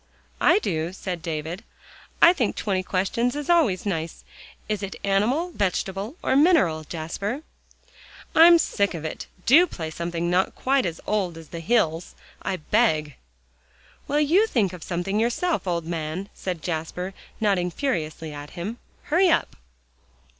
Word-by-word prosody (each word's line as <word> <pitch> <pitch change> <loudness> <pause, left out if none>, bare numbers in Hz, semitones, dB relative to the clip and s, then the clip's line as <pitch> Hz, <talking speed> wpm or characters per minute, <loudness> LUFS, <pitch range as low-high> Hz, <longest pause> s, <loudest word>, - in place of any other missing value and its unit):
"I - - +5
do," 170 - -2
said 185 -3 -5
David. 160 +2 -4 0.6
"I 340 - +9
think 245 - -1
'Twenty 190 -3 -1
Questions' 195 +7 0
is 295 +3 -1
always 235 - +3
nice. 165 -4 -3 0.4
Is 210 -1 -2
it 195 -1 -5
animal, 235 - +1
vegetable 195 - -2
or - - +2
mineral, 275 - +4
Jasper?" 195 - -4 0.9
"I'm 335 +1 +8
sick 200 - 0
of 160 -1 -6
it. 155 - -5 0.2
Do 325 +8 +7
play 160 - -6
something 170 +1 -3
not 180 +2 +1
quite 270 -4 +1
as 165 -1 -6
old 190 -6 -1
as 160 -2 -12
the 170 - -6
hills, 165 -4 0 0.3
I 195 - -2
beg." 155 - +1 0.9
"Well, 290 - +1
you 345 +9 +4
think 205 - +1
of 180 - -9
something 185 +5 -2
yourself, 240 - 0
old 170 -2 -1
man," 165 +3 -4
said 180 -4 -5
Jasper, 180 +3 -3 0.3
nodding 195 -5 +1
furiously 160 - -3
at 145 +4 -9
him. 210 +8 -5 0.2
"Hurry 350 +4 +3
up." - - +1
190 Hz, 145 wpm, -24 LUFS, 165-245 Hz, 0.9 s, I